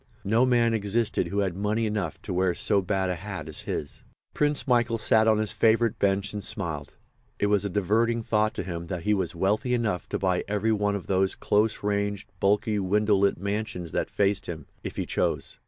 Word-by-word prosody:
No 115 +5 +3
man 120 -2 +3
existed 105 -3 0
who 100 +4 -1
had 95 -3 -1
money 105 +3 0
enough 105 -7 -2
to - - -4
wear 90 -1 +1
so 105 -1 +2
bad 95 -1 0
a - - -1
hat 95 -4 -6
as 80 - -3
his. 75 - -4 0.3
Prince 150 -1 0
Michael 120 -2 +2
sat 110 0 +3
on 110 -1 +4
his 110 -1 0
favourite 115 0 +2
bench 100 +1 +1
and 105 -1 -4
smiled. 80 -8 -4 0.4
It - - +1
was 105 0 +2
a - - -1
diverting 110 +5 +1
thought 110 0 +1
to - - -3
him 85 -2 -5
that 90 -1 -4
he 105 - +2
was 95 -3 -1
wealthy 105 +8 +1
enough 110 -7 -2
to - - -1
buy 90 -2 0
every 105 +2 0
one 105 -1 +1
of 100 - -5
those 95 0 +1
close 105 +1 +1
ranged, 100 -1 -1
bulky, 105 +2 +2
window 105 +2 +2
lit 100 0 +2
mansions 100 -3 -3
that - - -1
faced 100 0 0
him, 80 -2 -6 0.2
if - - -5
he - - -2
chose. - - -2
100 Hz, 205 wpm, -26 LUFS, 95-110 Hz, 0.4 s, on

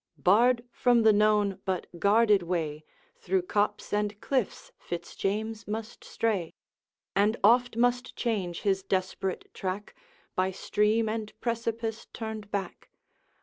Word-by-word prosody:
Barred 235 +6 +4
from 240 -2 +3
the 220 -1 +6
known 210 -2 +3
but 190 -2 -2
guarded 210 0 +4
way, 160 -3 -2 0.4
Through 185 0 0
copse 205 +3 -1
and 210 0 0
cliffs 255 -4 -2
Fitz 175 0 -6
James 215 +2 -2
must 220 +2 -5
stray, 200 -8 -1 0.6
And 210 +4 +3
oft 245 +3 +5
must 245 +1 +1
change 195 -8 -2
his 195 -1 +2
desperate 190 0 -2
track, 195 +2 -4 0.4
By 185 0 +2
stream 210 +4 +1
and 215 -1 -4
precipice 230 -1 -3
turned 220 -3 -6
back. 200 -2 -4
210 Hz, 125 wpm, -28 LUFS, 190-225 Hz, 0.6 s, the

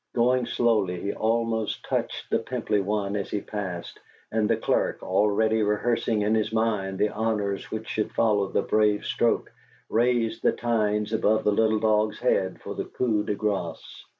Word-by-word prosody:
Going 125 +1 +2
slowly, 105 -7 +1
he 100 - -3
almost 115 -1 -1
touched - - -3
the - - +3
pimply 105 - -1
one 100 0 -1
as 100 - -3
he 105 - -1
passed, 95 -5 -6 0.3
and 110 -1 +1
the - - +3
clerk, - - 0
already 105 +3 +2
rehearsing 105 +1 +1
in 105 +1 +2
his 110 -1 +1
mind 105 -4 0
the 105 - +2
honors 105 -3 -2
which 110 0 -5
should 110 - -2
follow 105 -3 +2
the - - 0
brave 105 -1 +2
stroke, - - 0 0.4
raised 115 -1 +1
the - - +3
tines 105 -2 0
above 110 0 +2
the 105 - +3
little 110 +1 +2
dog's 110 0 +2
head 95 -7 0
for - - -5
the - - -4
coup 110 -4 0
de 105 - -2
grace. 100 -6 -3
105 Hz, 170 wpm, -26 LUFS, 105-110 Hz, 0.4 s, the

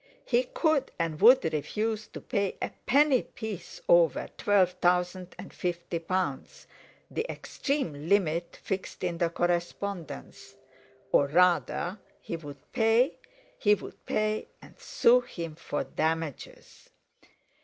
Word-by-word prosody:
He 245 +1 +2
could 315 +1 +1
and 165 -1 -2
would 245 +5 +8
refuse 215 +8 -2
to - - -9
pay 200 -1 -1
a - - -3 0.2
penny 275 0 +5
piece 220 - -8
over - - +4
twelve 200 -5 +3
thousand 180 +1 +1
and - - -10
fifty 175 -1 -3
pounds—the 185 - -5
extreme 170 - -3
limit 170 -4 +1
fixed 190 -1 -4
in 175 -2 -2
the 170 - +2
correspondence; 175 +1 -3 0.6
or 140 - +4
rather 180 +3 +2 0.2
he - - -5
would 145 -3 -11
pay, 225 +5 +3 0.4
he 210 -2 +5
would - - -11
pay 215 0 0
and - - -15
sue 250 +1 +4
him 170 -9 -6
for 150 -2 -3
damages. 160 -3 -4
185 Hz, 120 wpm, -28 LUFS, 170-225 Hz, 0.6 s, would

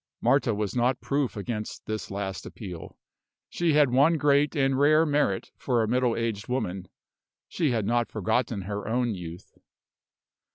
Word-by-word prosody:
Marta 135 -5 +2
was 105 -2 -3
not 125 +1 +1
proof 140 -5 -1
against 105 +1 -5
this 110 0 -4
last 95 -1 -4
appeal. 90 -7 -9 0.5
She 170 -2 +1
had 145 -4 +4
one 145 +6 +4
great 145 +1 +3
and 135 -2 +2
rare 155 +3 +5
merit 145 -10 0
for 120 -4 +1
a - - -1
middle 125 0 +1
aged 115 -3 -3
woman 95 -8 -3 0.6
she 160 -5 0
had 115 -5 0
not 120 +2 +1
forgotten 110 0 -1
her 100 +2 -5
own 120 0 0
youth. 85 -2 -9
120 Hz, 155 wpm, -27 LUFS, 105-140 Hz, 0.6 s, rare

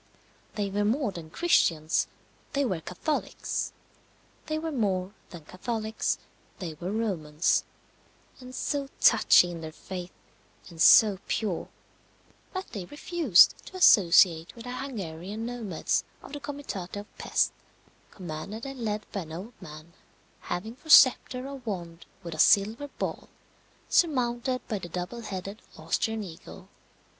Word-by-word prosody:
They 200 -2 -2
were 205 +1 0
more 230 +2 +1
than 170 -4 -9
Christians, 160 - +2 0.5
they 280 -1 +1
were 185 -9 -2
Catholics; 235 - -3 0.8
they 310 0 -1
were 320 +1 -3
more 195 -7 -1 0.2
than 170 -5 -11
Catholics, 220 +5 -2 0.4
they 175 -5 -5
were 175 +4 -5
Romans, 175 -8 0 0.8
and 255 0 -10
so 280 -1 -2
touchy 175 - +6
in 170 -1 -7
their 160 -1 -6
faith, 180 +2 -7 0.6
and 165 -2 -7
so 205 +1 +7
pure, 200 -7 -2 0.8
that 375 0 -6
they 200 -5 -5
refused 290 - +4
to - - -11
associate 170 - +5
with 230 - -10
the 245 - -6
Hungarian 210 -5 -5
nomads 230 -8 -1 0.2
of - - -12
the 290 - -4
comitate 275 -12 -6
of 205 +1 -9
Pesth, - - +1 0.6
commanded 185 - -7
and 270 -1 -7
led 215 -2 -2
by 200 - -3
an 160 -2 -10
old 205 +8 -9
man, 155 +2 -11 0.5
having 205 +6 -4
for 315 +4 -17
sceptre 255 -2 +6
a 280 - -6
wand 175 -9 -6 0.2
with 170 -1 -6
a 155 - -8
silver 215 - +4
ball, - - -5 0.6
surmounted 255 -5 +1
by 215 -4 -2
the 175 - -8
double 180 +8 -5
headed 195 0 -6 0.2
Austrian 215 +7 -1
eagle. 165 -4 -11
205 Hz, 135 wpm, -28 LUFS, 175-250 Hz, 0.8 s, so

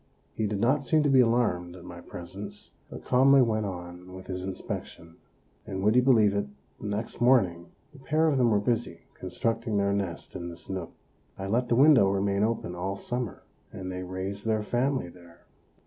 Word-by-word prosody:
He 110 - -1
did 100 -1 -2
not 135 +6 +2
seem 155 +4 +3
to 145 - +2
be 135 - +6
alarmed 115 -8 +2
at 90 - -12
my 85 0 -9
presence, 100 +5 -9 0.2
but - - -10
calmly 135 +1 +5
went 110 -3 0
on 90 0 -8
with 95 - -10
his 90 -1 -5
inspection; 85 -3 -6 0.5
and 95 0 -4
would 105 +3 +3
you 125 - +6
believe 110 -6 +4
it, 100 -7 -1 0.3
the - - -6
next 105 +4 -4
morning 95 -9 +3 0.2
the 145 - -14
pair 155 +4 +1
of 145 -4 +2
them 120 -2 +4
were 105 -2 +3
busy 115 +3 -1
constructing 115 -1 -2
their 100 0 +2
nest 95 -4 -4
in 85 0 -5
this 85 +2 -8
nook. 95 -1 -4 0.5
I 95 - -5
let 120 +5 0
the 120 - +3
window 135 -6 +6
remain 100 0 0
open 110 -6 -1
all 95 +3 -3
summer, 120 -1 -4 0.3
and 95 -1 -6
they 90 0 -5
raised 95 +3 -5
their 110 -1 +1
family 125 +1 0
there. 85 -1 -17
100 Hz, 195 wpm, -28 LUFS, 95-120 Hz, 0.5 s, be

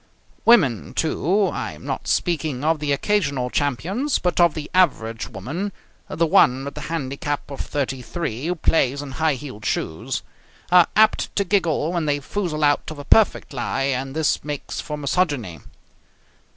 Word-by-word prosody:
Women, 160 - +4
too 185 +5 +1
I - - -4
am - - -13
not - - -4
speaking 155 -6 0
of 160 0 +2
the 145 -1 -1
occasional 140 -6 0
champions, 180 - 0
but 180 -1 -1
of 170 -3 +4
the 155 -2 -5
average 115 -11 +1
woman, 140 - -4 0.4
the 165 - +1
one 135 -7 +4
with 140 - -5
the - - -7
handicap 145 -2 -3
of 140 - -7
33, 135 0 -3
who 180 - 0
plays 140 -4 +1
in 140 - -8
high 155 +2 +1
heeled 130 -6 -9
shoes 80 0 -2 0.5
are 180 -1 +7
apt 220 0 +3
to 200 - +2
giggle 175 -4 +1
when 170 -3 -1
they 145 0 +1
foozle 155 0 -3
out 145 -1 +2
of 155 - -8
a 145 - -8
perfect 215 -3 +3
lie, 130 +1 -2
and 135 0 -2
this 160 -2 +1
makes 145 -1 -5
for 150 -2 -5
misogyny. 140 - -1
150 Hz, 165 wpm, -22 LUFS, 135-175 Hz, 0.5 s, are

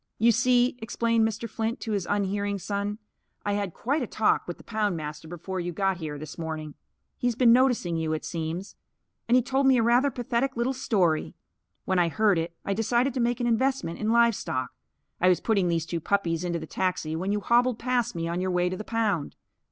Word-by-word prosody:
"You 230 +2 +5
see," 245 +1 +3
explained 230 0 +1
Mr. 220 +1 -4
Flint, 225 +2 -3
to 225 - -4
his 200 -4 -1
unhearing 200 0 0
son, 200 +2 -3 0.5
"I 205 - +1
had 200 -2 -1
quite 280 - -1
a 245 - -2
talk 215 - +1
with 175 - -5
the - - -15
poundmaster 165 -9 -3
before 180 +2 -5
you 175 0 -3
got 195 +1 0
here, 155 -3 -5
this 155 +2 -9
morning. 155 -2 -5 0.5
He's 245 -1 0
been 235 -1 +6
noticing 245 -10 +2
you, 160 -1 -1
it 155 - -3
seems. 170 +3 -4 0.5
And 240 - +4
he 250 - +4
told 265 +2 +1
me 260 -1 +6
a 230 - +3
rather 245 +4 +4
pathetic 245 +1 -2
little 240 +3 +1
story. 185 -11 0 0.5
When 190 -1 +1
I 170 -1 +3
heard 200 +2 +2
it 170 +1 -4
I 200 - 0
decided 235 +5 +1
to 255 - -2
make 240 0 +1
an 245 - 0
investment 235 -7 0
in 215 - -1
livestock. 230 - +2 0.5
I 180 - +4
was 180 - +3
putting 200 -5 +1
these 165 -2 0
two 170 0 -3
puppies 170 -2 0
into 175 -1 -1
the 160 - -6
taxi 170 -2 -2
when 185 +5 -2
you 210 - +1
hobbled 240 +3 +2
past 245 -3 0
me 165 0 -2
on 170 +2 -2
your 185 - -1
way 180 0 +1
to 185 - -4
the 215 - -5
pound. 210 -9 -1
205 Hz, 215 wpm, -27 LUFS, 170-235 Hz, 0.5 s, been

